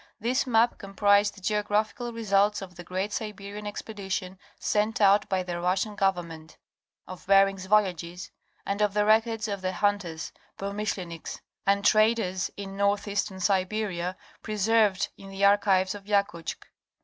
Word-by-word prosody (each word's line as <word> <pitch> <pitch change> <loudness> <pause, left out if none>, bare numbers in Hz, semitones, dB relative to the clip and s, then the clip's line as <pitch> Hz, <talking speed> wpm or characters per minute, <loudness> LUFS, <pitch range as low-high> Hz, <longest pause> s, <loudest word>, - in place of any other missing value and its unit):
This 255 +4 0
map 235 0 +3
com 195 0 -10
prised 205 0 +4
the 195 - -14
geographical 210 +4 -1
results 210 -2 +1
of 180 -2 -10
the 175 - -9
great 190 +4 -3
Siberian 210 -1 -5
expedition 195 -3 -5 0.2
sent 215 +3 0
out 205 0 +4
by 190 -2 0
the 175 -1 -4
Russian 190 +4 0
government; 170 -5 -2 0.5
of 185 -1 -10
Bering's 195 -1 +4
voyages; 180 -3 0 0.3
and 200 +1 -2
of 210 -1 +1
the 210 0 +3
records 225 +1 +2
of 200 -2 -4
the 185 0 -2
hunters 185 -5 -1 0.3
(Promishleniks) 195 -4 -4 0.3
and 200 0 +2
traders 215 -4 +3
in 195 -1 -6
northeastern 200 0 0
Siberia 185 -1 -1 0.2
preserved 210 -2 +2
in 195 - -11
the 195 +1 0
archives 200 -2 +3
of 205 -1 -10
Yakutsk. 200 -5 -1
200 Hz, 140 wpm, -27 LUFS, 185-210 Hz, 0.5 s, prised